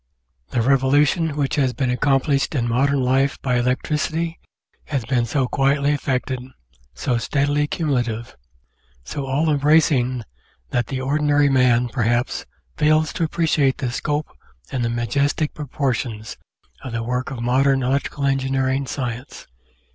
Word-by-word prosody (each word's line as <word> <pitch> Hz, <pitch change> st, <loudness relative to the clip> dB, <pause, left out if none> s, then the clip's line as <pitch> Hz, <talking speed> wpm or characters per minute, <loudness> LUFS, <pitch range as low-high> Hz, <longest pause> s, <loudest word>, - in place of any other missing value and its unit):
The 120 Hz, -3 st, 0 dB
revolution 140 Hz, +4 st, +3 dB
which 140 Hz, -1 st, 0 dB
has 130 Hz, -3 st, +2 dB
been 130 Hz, -2 st, -1 dB
accomplished 135 Hz, +3 st, +1 dB
in 120 Hz, -3 st, 0 dB
modern 135 Hz, +4 st, +2 dB
life 135 Hz, +2 st, +1 dB
by 125 Hz, -2 st, +1 dB
electricity 155 Hz, +6 st, -1 dB, 0.5 s
has 135 Hz, -6 st, -2 dB
been 120 Hz, -2 st, +1 dB
so 130 Hz, +2 st, 0 dB
quietly 140 Hz, +2 st, +2 dB
effected, 130 Hz, -2 st, -1 dB, 0.6 s
so 120 Hz, -3 st, 0 dB
steadily 145 Hz, +3 st, +1 dB
cumulative, 120 Hz, -8 st, -2 dB, 0.7 s
so 140 Hz, -, -5 dB
all 150 Hz, +4 st, +1 dB
embracing 140 Hz, -4 st, +3 dB, 0.5 s
that 120 Hz, -2 st, 0 dB
the 130 Hz, -1 st, -3 dB
ordinary 145 Hz, +1 st, +2 dB
man, 125 Hz, -2 st, +3 dB
perhaps, 120 Hz, 0 st, -1 dB, 0.3 s
fails 155 Hz, +1 st, +3 dB
to 165 Hz, -, 0 dB
ap 155 Hz, -, -6 dB
preciate 155 Hz, -5 st, +2 dB
the 125 Hz, -3 st, -2 dB
scope 150 Hz, +3 st, -3 dB, 0.4 s
and 130 Hz, -3 st, -1 dB
the 115 Hz, -, 0 dB
majestic 140 Hz, +6 st, 0 dB
proportions 125 Hz, -7 st, -3 dB, 0.5 s
of 130 Hz, -, -6 dB
the 115 Hz, 0 st, -2 dB
work 125 Hz, +2 st, -2 dB
of 135 Hz, -3 st, -6 dB
modern 135 Hz, +2 st, +2 dB
electrical 140 Hz, +2 st, -1 dB
engineering 135 Hz, 0 st, 0 dB
science. 125 Hz, 0 st, -5 dB
135 Hz, 135 wpm, -21 LUFS, 125-145 Hz, 0.7 s, revolution